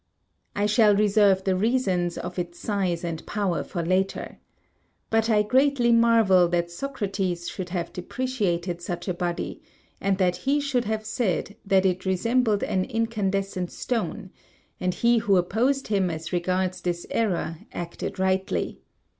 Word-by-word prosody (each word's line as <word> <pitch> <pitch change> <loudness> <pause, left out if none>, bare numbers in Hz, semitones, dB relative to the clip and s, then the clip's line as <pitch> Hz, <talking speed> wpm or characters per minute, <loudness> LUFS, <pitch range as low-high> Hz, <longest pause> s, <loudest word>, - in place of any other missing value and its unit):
I 205 - +1
shall 210 0 +5
reserve 200 -2 +4
the 190 -1 +1
reasons 190 -5 +1
of 180 +1 -5
its 175 0 -4
size 185 -5 -1
and 165 -2 -4
power 200 -5 -1
for 170 -3 -4
later. 185 +2 -1 0.7
But 225 0 +2
I 210 -2 +4
greatly 260 +1 +3
marvel 225 -6 +5
that 170 0 -1
Socrates 195 -6 -3
should 180 -1 -5
have 175 -1 -3
depreciated 180 -5 -2
such 175 +1 -5
a 185 - 0
body, 175 -1 -3 0.4
and 195 -1 +1
that 180 -2 +2
he 275 +9 +1
should 270 -4 0
have 215 0 -2
said 215 -2 -1
that 195 -1 +4
it 185 -1 +1
resembled 220 +3 +2
an 185 -1 0
incandescent 195 -5 -1
stone; 190 -6 -3 0.5
and 180 -1 -1
he 235 0 +3
who 200 -3 +3
opposed 235 +10 +1
him 195 -4 +2
as 160 +1 -5
regards 185 +1 0
this 175 -1 -2
error 170 -7 -1
acted 175 +3 -5
rightly. 190 0 -1
190 Hz, 145 wpm, -25 LUFS, 175-220 Hz, 0.7 s, shall